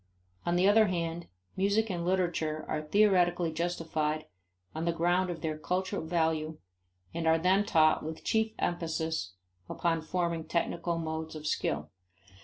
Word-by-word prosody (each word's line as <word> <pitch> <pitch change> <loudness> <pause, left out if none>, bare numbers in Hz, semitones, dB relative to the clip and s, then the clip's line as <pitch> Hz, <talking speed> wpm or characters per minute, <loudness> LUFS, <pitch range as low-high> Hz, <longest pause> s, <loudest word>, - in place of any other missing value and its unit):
On 175 - +2
the 180 +2 +4
other 215 +1 +6
hand, 170 -2 -2 0.3
music 205 +3 +1
and 175 -2 -2
literature 170 -4 0
are 155 - -1
theoretically 175 -1 +3
justified 160 -2 -1 0.5
on 160 +1 -3
the 170 - +2
ground 175 +2 +1
of 170 -3 -5
their 155 -1 -2
culture 185 +4 -1
value 160 -1 0 0.6
and 165 -1 -2
are 160 0 +5
then 185 +4 +3
taught 155 -5 +4
with 160 +1 -6
chief 220 -1 +1
emphasis 160 - -2 0.4
upon 165 -2 0
forming 170 -1 -2
technical 170 +1 -1
modes 160 -1 -4
of 155 0 -8
skill. 150 - -1
170 Hz, 145 wpm, -30 LUFS, 160-180 Hz, 0.6 s, other